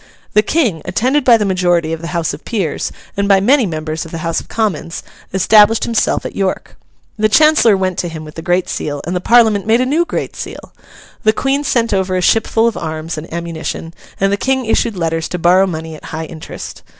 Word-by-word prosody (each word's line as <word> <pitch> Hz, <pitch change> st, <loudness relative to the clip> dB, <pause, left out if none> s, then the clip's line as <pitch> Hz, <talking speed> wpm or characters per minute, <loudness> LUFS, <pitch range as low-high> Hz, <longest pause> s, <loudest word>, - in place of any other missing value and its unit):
The 210 Hz, -, +5 dB
King, 220 Hz, -, 0 dB
attended 260 Hz, +5 st, +1 dB
by 240 Hz, -3 st, +6 dB
the 210 Hz, -, -1 dB
majority 175 Hz, -4 st, +1 dB
of 165 Hz, -, -5 dB
the 165 Hz, -, -5 dB
House 170 Hz, -2 st, -2 dB
of -, -, -9 dB
Peers, 195 Hz, -10 st, -2 dB, 0.2 s
and 200 Hz, 0 st, 0 dB
by 195 Hz, -1 st, +5 dB
many 245 Hz, +3 st, +3 dB
members 155 Hz, -1 st, -4 dB
of 165 Hz, -, -10 dB
the 165 Hz, -, -6 dB
House 165 Hz, -1 st, 0 dB
of -, -, -12 dB
Commons, 175 Hz, -7 st, -2 dB, 0.3 s
established 210 Hz, +3 st, +5 dB
himself 230 Hz, -2 st, 0 dB
at -, -, -6 dB
York. 195 Hz, -1 st, -2 dB, 0.4 s
The 215 Hz, 0 st, +3 dB
Chancellor 305 Hz, -5 st, +5 dB
went 185 Hz, -1 st, -1 dB
to 175 Hz, -, -1 dB
him 160 Hz, -2 st, -7 dB
with 155 Hz, -, -11 dB
the 165 Hz, -, -7 dB
Great 175 Hz, +1 st, 0 dB
Seal, 145 Hz, -1 st, -4 dB
and 175 Hz, +3 st, -3 dB
the 180 Hz, -, -1 dB
Parliament 220 Hz, -2 st, +4 dB
made 225 Hz, +2 st, +4 dB
a 255 Hz, -, +2 dB
new 305 Hz, +6 st, +2 dB
Great -, -, -4 dB
Seal. -, -, -8 dB, 0.5 s
The 215 Hz, -, +3 dB
Queen 275 Hz, +5 st, 0 dB
sent 235 Hz, -5 st, +1 dB
over 190 Hz, -1 st, 0 dB
a -, -, 0 dB
ship 225 Hz, +5 st, +3 dB
full 225 Hz, +1 st, +2 dB
of 230 Hz, -, -1 dB
arms 160 Hz, 0 st, -4 dB
and 155 Hz, +1 st, -8 dB
ammunition, 165 Hz, 0 st, -5 dB, 0.3 s
and 195 Hz, +1 st, +2 dB
the -, -, +1 dB
King 265 Hz, +2 st, 0 dB
issued 225 Hz, -1 st, 0 dB
letters 165 Hz, -1 st, -1 dB
to 180 Hz, -, -3 dB
borrow 180 Hz, +3 st, +4 dB
money 160 Hz, -2 st, -5 dB
at -, -, -13 dB
high 160 Hz, 0 st, -5 dB
interest. 160 Hz, -1 st, -9 dB
190 Hz, 220 wpm, -16 LUFS, 165-225 Hz, 0.5 s, by